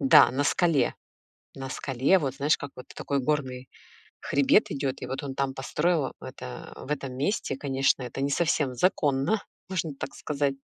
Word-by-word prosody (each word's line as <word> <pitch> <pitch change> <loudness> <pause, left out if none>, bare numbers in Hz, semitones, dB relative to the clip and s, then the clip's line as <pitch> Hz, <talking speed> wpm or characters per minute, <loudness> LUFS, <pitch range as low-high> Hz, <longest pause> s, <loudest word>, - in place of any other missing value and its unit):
Да, 135 -2 +7
на 135 +4 0
скале. 165 -1 +2 0.6
На 135 0 -6
скале, 135 +7 +2
вот, 135 -6 -2
знаешь, 145 +2 +2
как 145 - -7
вот 125 - -10
такой 140 - -1
горный 130 -2 -1 0.5
хребет 140 +9 +3
идёт, 140 -2 -1
и - - -3
вот 130 +3 -4
он 140 -2 -4
там 135 0 -1
построил 150 +2 0
это, 60 - -8
в - - -9
этом 135 -3 -2
месте, 145 - -1
конечно, 135 -1 +1
это 125 +2 -6
не 140 - +1
совсем 145 -3 +1
законно, 150 - +2 0.3
можно 185 -4 -1
так - - -5
сказать. 140 -2 -1
140 Hz, 170 wpm, -27 LUFS, 135-150 Hz, 0.6 s, Да